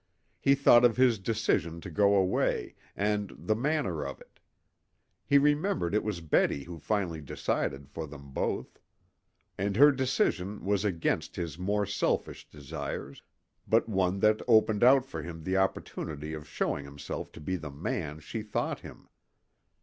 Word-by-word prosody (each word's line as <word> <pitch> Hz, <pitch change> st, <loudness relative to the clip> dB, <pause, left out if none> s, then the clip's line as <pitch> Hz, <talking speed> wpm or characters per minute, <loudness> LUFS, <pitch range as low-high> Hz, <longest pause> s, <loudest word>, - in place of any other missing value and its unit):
He 140 Hz, -, +4 dB
thought 125 Hz, -3 st, +6 dB
of 120 Hz, -1 st, +4 dB
his 125 Hz, -4 st, +4 dB
decision 95 Hz, -6 st, 0 dB
to 85 Hz, -, -8 dB
go 100 Hz, +4 st, +4 dB
away, 95 Hz, -2 st, +1 dB, 0.2 s
and 105 Hz, 0 st, 0 dB
the 85 Hz, +9 st, 0 dB
manner 115 Hz, -, -1 dB
of 70 Hz, -1 st, -6 dB
it. -, -, -19 dB, 0.9 s
He 140 Hz, -, +6 dB
remembered 145 Hz, -, +2 dB
it 105 Hz, -, +2 dB
was 105 Hz, -5 st, -3 dB
Betty 75 Hz, -3 st, +1 dB
who 85 Hz, 0 st, -9 dB
finally 90 Hz, -3 st, -1 dB
decided 70 Hz, -1 st, -2 dB
for 80 Hz, +2 st, -6 dB
them 70 Hz, -1 st, -11 dB
both. -, -, -3 dB, 0.8 s
And 100 Hz, +1 st, 0 dB
her 145 Hz, +5 st, +8 dB
decision 115 Hz, -8 st, -1 dB
was 100 Hz, 0 st, +1 dB
against 85 Hz, -5 st, -1 dB
his 85 Hz, -3 st, -5 dB
more 100 Hz, +2 st, 0 dB
selfish 100 Hz, -, -2 dB
desires, 70 Hz, -1 st, -6 dB, 0.5 s
but 115 Hz, +1 st, +3 dB
one 95 Hz, -2 st, 0 dB
that 110 Hz, 0 st, +4 dB
opened 110 Hz, -2 st, +4 dB
out 130 Hz, +1 st, +6 dB
for 135 Hz, -, -6 dB
him 80 Hz, -2 st, -8 dB
the 95 Hz, +2 st, 0 dB
opportunity 80 Hz, -5 st, -2 dB
of 75 Hz, -1 st, -7 dB
showing 70 Hz, -, -1 dB
himself 70 Hz, +1 st, -7 dB
to -, -, -10 dB
be 85 Hz, +5 st, -2 dB
the 80 Hz, -4 st, -6 dB
man 75 Hz, +1 st, -4 dB
she 110 Hz, +8 st, -5 dB
thought 105 Hz, 0 st, -2 dB
him. -, -, -12 dB
95 Hz, 155 wpm, -29 LUFS, 80-110 Hz, 0.9 s, her